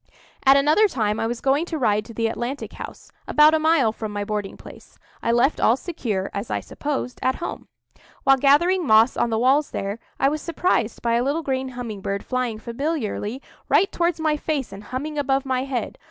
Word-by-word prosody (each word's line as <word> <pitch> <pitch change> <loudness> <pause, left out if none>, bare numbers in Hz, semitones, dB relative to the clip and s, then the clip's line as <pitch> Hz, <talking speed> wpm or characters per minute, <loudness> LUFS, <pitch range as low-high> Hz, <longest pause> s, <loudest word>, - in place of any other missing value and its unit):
At 270 +1 +8
another 305 +10 +4
time 215 - -1
I 225 - 0
was 235 0 -4
going 275 +3 +2
to 330 -2 -4
ride 210 -6 +1
to 230 - -11
the 230 - 0
Atlantic 240 +4 -3
House, - - -10 0.2
about 300 +1 +6
a 315 - +3
mile 310 -7 +3
from 220 -1 -6
my 205 0 -3
boarding 210 -1 -4
place. - - -14 0.2
I 230 - +1
left 240 +5 +2
all 235 - +4
secure, 225 - -3
as 200 +3 -4
I - - -1
supposed, 285 -4 -4
at 260 - +1
home. 345 - -6 0.6
While 270 0 +5
gathering 310 +6 +3
moss 220 +2 +5
on 235 - +1
the 225 - 0
walls 270 +5 +3
there, 200 +3 -4 0.2
I 270 - +4
was 300 +2 -1
surprised 330 -9 -1
by 235 -1 +1
a 240 - +1
little 290 +5 -1
green 265 -2 -2
humming 220 -5 -5
bird 200 +1 -3
flying 250 -3 -2
familiarly 240 -1 -3 0.3
right 390 - +4
towards 340 -1 0
my 310 -1 +1
face 295 -6 -2
and 200 +1 -10
humming 295 +5 -4
above 275 -1 0
my 260 0 -1
head. 260 -3 -4
260 Hz, 205 wpm, -23 LUFS, 225-300 Hz, 0.6 s, At